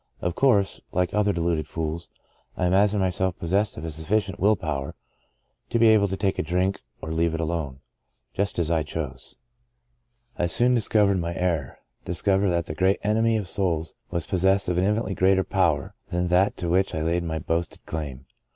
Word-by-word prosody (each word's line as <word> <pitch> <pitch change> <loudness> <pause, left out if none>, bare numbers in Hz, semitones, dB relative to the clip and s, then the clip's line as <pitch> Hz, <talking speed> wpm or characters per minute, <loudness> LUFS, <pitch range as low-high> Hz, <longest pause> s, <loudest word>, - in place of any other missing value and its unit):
Of 85 - -2
course, 100 -5 +2
like 90 0 0
other 105 -1 +2
deluded 85 -4 -1
fools, 80 +1 -4 0.5
I 90 - 0
imagined 100 +3 +3
myself 95 0 -1
pos 85 - -5
sessed 105 +1 +1
of 80 +1 -5
sufficient 95 +6 -1
will 105 +3 +4
power 75 -7 -4 0.7
to - - +1
be 115 -1 +6
able 105 -2 +5
to 95 0 -3
take 95 -1 -1
a - - +3
drink 90 +4 -1 0.2
or 80 - -4
leave 80 0 +1
it - - -4
alone 80 -5 -3 0.3
— - - -48
^just 100 +1 -1
as 85 -1 0
I 80 -1 +2
chose. 75 -4 -6 1.0
"I 85 - +2
soon 120 +9 +3
discovered 105 -4 +3
my 85 0 -3
error 85 -7 -1 0.2
— - - -47
discovered 95 +3 +1
that 85 -2 0
the - - -5
great 95 +4 +2
Enemy 110 +2 +2
of 105 -4 -4
souls 85 -4 -1 0.2
was 85 -3 -2
pos 90 +1 -2
sessed 95 0 +3
of 90 0 +1
an 90 - +2
infinitely 105 0 0
greater 95 0 +3
power 85 -9 0
than 90 0 -1
that 90 +3 +3
to 90 - -3
which 95 +3 +1
I 80 - -1
laid 85 +2 0
my 80 -1 -3
boasted 80 +2 -3
claim. 70 -4 -5
90 Hz, 195 wpm, -25 LUFS, 80-100 Hz, 1.0 s, be